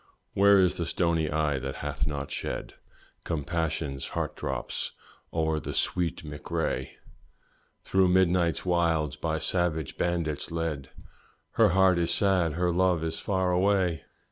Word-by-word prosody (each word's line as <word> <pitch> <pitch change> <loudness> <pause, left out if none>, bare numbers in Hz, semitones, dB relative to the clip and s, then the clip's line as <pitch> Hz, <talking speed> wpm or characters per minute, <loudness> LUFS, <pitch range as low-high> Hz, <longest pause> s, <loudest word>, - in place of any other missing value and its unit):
Where 100 0 +6
is 90 -2 +3
the 85 - -2
stony 85 -3 +1
eye 75 -2 0
that 65 +1 -5
hath 70 -1 -2
not 70 -2 -4
shed - - -4 0.5
Compassion's 80 -3 -2
heart - - -2
drops - - -3 0.4
o'er 80 -1 0
the - - -6
sweet 85 -2 0
Mc 75 -1 -9
Rea? 65 0 -2 0.9
Through 95 -1 +3
midnight's 90 -2 +2
wilds 85 -5 +1
by 80 -1 -2
savage 80 -2 0
bandits 85 -4 -1
led, 80 -5 -3 0.6
"Her - - +4
heart 95 -2 +5
is 85 - 0
sad 95 -6 +2
her 90 +2 +1
love 90 -2 +2
is 80 0 -2
far 95 -2 0
away!" 90 -2 +1
85 Hz, 140 wpm, -28 LUFS, 75-90 Hz, 0.9 s, Where